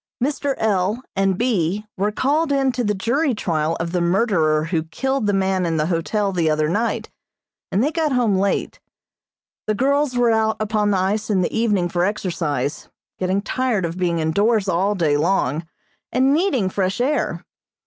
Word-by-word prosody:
Mr. 275 +1 -1
L. 210 +2 0
and 195 -1 +1
B. 210 -4 0
were 205 +2 0
called 290 +7 +1
in 270 -1 +2
to 245 0 -2
the 210 -2 0
jury 250 +7 0
trial 165 -4 -1
of 165 0 -3
the 180 -1 0
murderer 170 -5 +2
who 165 0 -1
killed 265 +8 -2
the - - +3
man 190 -1 +1
in 165 -2 0
the 150 - +1
hotel 190 +5 0
the 170 -4 +1
other 155 0 +1
night, 215 +8 -1 0.6
and 200 +5 +2
they 295 - +1
got 320 -2 0
home 240 -6 +2
late. 195 +1 -1 0.9
The 215 - +1
girls 275 +1 +1
were 240 -1 +3
out 220 0 +1
upon 215 -1 0
the 200 - +2
ice 205 +4 -1
in 195 -3 +2
the 175 - -2
evening 210 -6 +1
for 175 0 -1
exercise, 165 -8 -2 0.3
getting 190 +2 0
tired 245 -6 0
of 170 +2 -5
being 175 -2 +1
indoors 200 +7 +1
all 190 +3 +1
day 155 -6 +2
long, 160 -1 0 0.4
and 265 +2 +3
needing 290 - +1
fresh 190 +1 -1
air. 280 +5 -1
200 Hz, 180 wpm, -21 LUFS, 175-235 Hz, 0.9 s, the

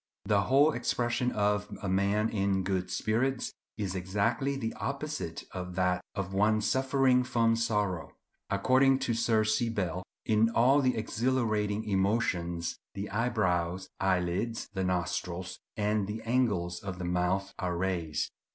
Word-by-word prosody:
The 100 -1 +3
whole 140 +4 +5
expression 120 0 0
of 105 0 0
a - - -2
man 100 +3 +2
in 100 -2 0
good 95 -1 -1
spirits 125 +4 0 0.2
is 100 -4 -2
exactly 100 +9 0
the 115 -4 -3
opposite 140 - -4
of 90 -1 -6
that 90 0 +1
of 95 -1 -3
one 105 +2 +3
suffering 130 +1 +3
from 115 -2 +2
sorrow. 105 -6 -1 0.4
According 130 +6 +4
to 130 -3 -1
Sir 115 -1 +2
C. 110 +2 +1
Bell, 90 -5 -2 0.2
"In 110 +1 +3
all 130 +5 +4
the 130 -3 +1
exhilarating 110 -2 0
emotions 95 -4 0 0.2
the 100 +1 -5
eyebrows, 95 -6 0
eyelids, 95 +4 0
the 95 -2 -1
nostrils, 90 0 -2 0.2
and 105 -1 +1
the 110 +2 -5
angles 105 -8 0
of 95 -2 -6
the 90 - -4
mouth 90 +2 0
are 90 -1 -1
raised. 85 -4 -1
105 Hz, 140 wpm, -30 LUFS, 95-115 Hz, 0.4 s, whole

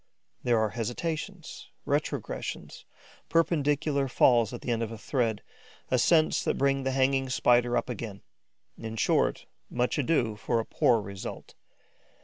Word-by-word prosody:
There 120 -2 +2
are 110 -1 +1
hesitations, 160 - -5 0.2
retrogressions, 145 +1 -3 0.4
perpendicular 145 -4 +1
falls 120 -2 +4
at 120 - -7
the 125 - -3
end 115 -1 0
of 115 -1 -3
a 115 - -6
thread, 115 -2 -1 0.5
ascents 155 +6 +3
that - - 0
bring 135 0 +2
the 135 - -1
hanging 135 0 +1
Spider 120 -1 +3
up - - -1
again. 110 -4 -6 0.6
In 110 0 -6
short - - +1 0.2
much 125 +4 0
ado 125 -6 +1
for 115 +2 0
a 115 - -2
poor 120 -2 +3
result. 100 -2 -8
125 Hz, 135 wpm, -28 LUFS, 115-140 Hz, 0.6 s, falls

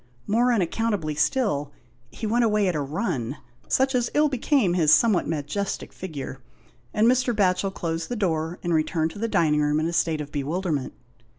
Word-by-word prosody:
More 235 +4 +2
unaccountably 205 -5 0
still, 150 - 0 0.4
he 220 - -7
went 235 +3 +2
away 210 -3 +2
at 180 - +1
a 150 - -1
run, 140 - -3 0.3
such 265 +1 +2
as 245 -2 +1
ill 300 0 +4
became 260 - +1
his 160 -4 +3
somewhat 195 +2 +4
majestic 160 +6 -3
figure, 140 -7 -7 0.5
and 215 - +2
Mr. 250 0 +3
Batchel 195 -1 +2
closed 165 -3 -3
the 245 - -2
door 165 -4 -1
and 175 -1 0
returned 160 0 +1
to 205 - -10
the 230 - 0
dining 150 -8 +2
room 150 +1 +2
in 155 - 0
a 170 - -2
state 165 -2 +1
of 145 -1 -6
bewilderment. 150 0 -2
175 Hz, 180 wpm, -25 LUFS, 155-225 Hz, 0.5 s, ill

